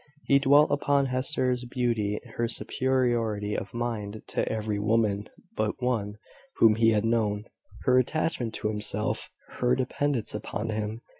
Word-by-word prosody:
He 140 - +4
dwelt 145 +2 +5
upon 140 -1 +2
Hester's 130 -1 0
beauty, 120 -4 -1 0.2
her 120 - 0
superiority 115 -4 0
of 95 - -4
mind 110 -3 -4
to - - -1
every 110 -2 -2
woman 105 -1 +1 0.3
but 110 0 -1
one 115 -5 -1 0.4
whom 110 -1 +6
he 115 +1 +4
had 105 -1 +2
known, 110 -3 +1 0.4
her 130 0 +5
attachment 130 -3 -1
to 105 - -1
himself; 105 0 -1 0.3
her 125 0 +3
dependence 130 -1 -1
upon 105 +1 -4
him. 110 +1 -3
115 Hz, 140 wpm, -27 LUFS, 105-125 Hz, 0.4 s, whom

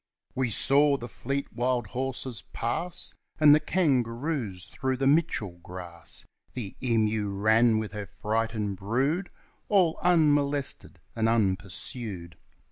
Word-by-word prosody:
We 130 -2 0
saw 140 +5 +4
the 120 - -7
fleet 135 +4 -4
wild 125 -1 0
horses 130 -1 -3
pass, 170 +10 -3 0.3
And 150 -1 +8
the 150 - +6
kangaroos 125 - 0
through 130 -1 -2
the 135 - 0
Mitchell 135 - +1
grass, 90 -1 -7 0.3
The 110 -7 -5
emu 110 -4 +1
ran 110 +3 +4
with 110 -3 -3
her 105 -1 -6
frightened 105 0 -2
brood 135 - 0 0.4
All 185 -6 +3
unmolested 145 -5 +2 0.2
and 115 0 +2
unpursued. 95 -2 -2
120 Hz, 120 wpm, -28 LUFS, 105-140 Hz, 0.4 s, And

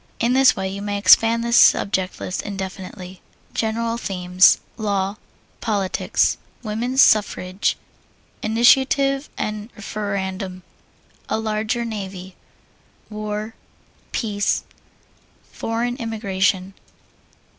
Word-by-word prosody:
In 235 +2 +2
this 265 0 +5
way 190 -1 -2
you 195 +1 -5
may 205 0 -2
expand 225 +3 +5
this 235 0 +2
subject 190 -5 +3
list 185 - -3
indefinitely. 190 -2 -7 0.3
GENERAL 230 +1 -1
THEMES 180 -4 +4 0.2
Law. 200 -1 -1 0.4
Politics. 200 -4 0 0.2
Woman's 240 +5 +2
Suffrage. 195 -2 +2 0.6
Initiative 270 +5 +3
and 215 +1 -4
Referendum. 195 -3 -4 0.7
A - - 0
Larger 220 +2 -1
Navy. 190 -4 -6 0.8
War. 215 +1 -4 0.6
Peace. 205 -3 0 0.9
Foreign 235 +2 -2
Immigration. 195 -5 -1
210 Hz, 90 wpm, -21 LUFS, 190-230 Hz, 0.9 s, this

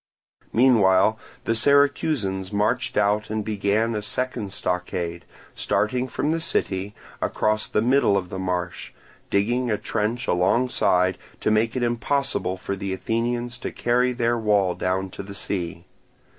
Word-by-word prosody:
Meanwhile 110 -4 +4 0.2
the 115 - +1
Syracusans 135 -7 +2
marched 110 +5 0
out 105 +1 +2
and 110 -1 -2
began 105 +2 0
a 105 - -2
second 110 0 -3
stockade, 90 -3 -3 0.3
starting 125 +4 0
from 145 +4 -1
the 165 - 0
city, 100 - -1 0.3
across 110 0 0
the 105 - 0
middle 125 -5 +3
of 90 -2 -3
the 95 - -5
marsh, 90 -1 -3 0.4
digging 120 +5 +1
a 105 - +1
trench 115 +4 -2
alongside 90 -1 +2 0.2
to - - +1
make 110 +2 +2
it 125 - 0
impossible 120 -4 0
for 100 +1 -4
the 95 0 -4
Athenians 120 +4 -2
to - - -4
carry 125 +1 +1
their 120 -1 0
wall 100 -4 +2
down 95 +1 -2
to - - -7
the 100 0 -9
sea. 85 -3 -4
105 Hz, 145 wpm, -24 LUFS, 95-120 Hz, 0.4 s, Meanwhile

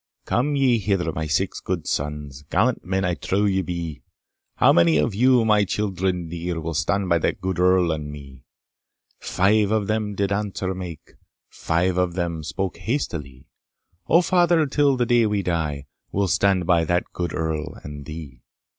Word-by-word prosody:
"Come 145 +5 0
ye 130 -4 +3
hither 95 -4 0
my 80 0 -4
'six' 75 - -1
good - - -3
sons, 75 -1 -3
Gallant 115 +6 +1
men 95 +1 -1
I 90 - +1
trow 100 +4 0
ye 95 -1 +2
be, 85 -4 -5 0.5
How - - +5
many 85 -2 +4
of 75 +7 +1
you, 125 +2 +4
my 105 -2 +4
children 95 -3 -1
dear, 85 +1 -4
Will 80 +1 -4
stand 100 +5 0
by 85 -1 +3
that - - -1
good 95 -2 -3
Earl 90 -1 +4
and 75 -2 -4
me?" 70 -3 -11 0.8
"Five" 100 +2 +2
of 110 -1 +1
them 105 -1 -1
did 100 0 -1
answer 100 -2 -2
make 90 -4 -9 0.3
"Five" 90 +2 0
of 90 -1 0
them 85 -3 -2
spoke 95 +4 -3
hastily, 85 - -4 0.6
"O 170 - +5
father, 175 -2 +3
till 140 -1 +2
the 120 - +1
day 120 -2 +3
we 105 -2 -1
die, 75 -6 -2 0.3
We'll 100 0 0
stand 95 0 +2
by 85 -1 +3
that 90 +3 +1
good 90 -1 -3
Earl 80 -1 -3
and 75 -1 -8
thee." 75 -6 -9
90 Hz, 175 wpm, -23 LUFS, 80-105 Hz, 0.8 s, How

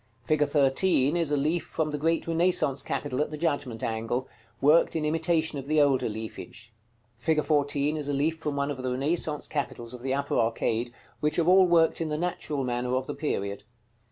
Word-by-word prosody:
Fig. 155 -2 +2
13 145 +1 +2
is 165 -3 +1
a 145 - +2
leaf 155 +5 0
from 155 -1 -2
the 150 - -2
great 165 +2 +1
Renaissance 165 -5 +2
capital 140 -1 -2
at 150 - 0
the 150 - -6
Judgment 145 -8 -2
angle, 115 +3 -2 0.3
worked 150 +5 +4
in 155 -1 0
imitation 160 -1 0
of 135 - -9
the 155 +1 +2
older 140 -5 +3
leafage. 110 +1 -8 0.4
Fig. 150 +6 0
14 145 0 +1
is 150 -2 -3
a 145 - -1
leaf 155 +4 0
from 150 -3 -3
one 140 +1 -1
of 140 - -5
the 130 - -2
Renaissance 150 +3 -1
capitals 125 -5 -4
of 125 - -9
the 135 +1 -1
upper 140 0 -1
arcade, 115 +1 0 0.3
which 150 0 0
are 170 - +2
all 185 0 +6
worked 165 -1 +3
in 160 - -1
the 150 - -2
natural 165 -4 -2
manner 125 0 -1
of 130 0 -1
the - - -4
period. 100 -9 -3
145 Hz, 200 wpm, -27 LUFS, 130-160 Hz, 0.4 s, all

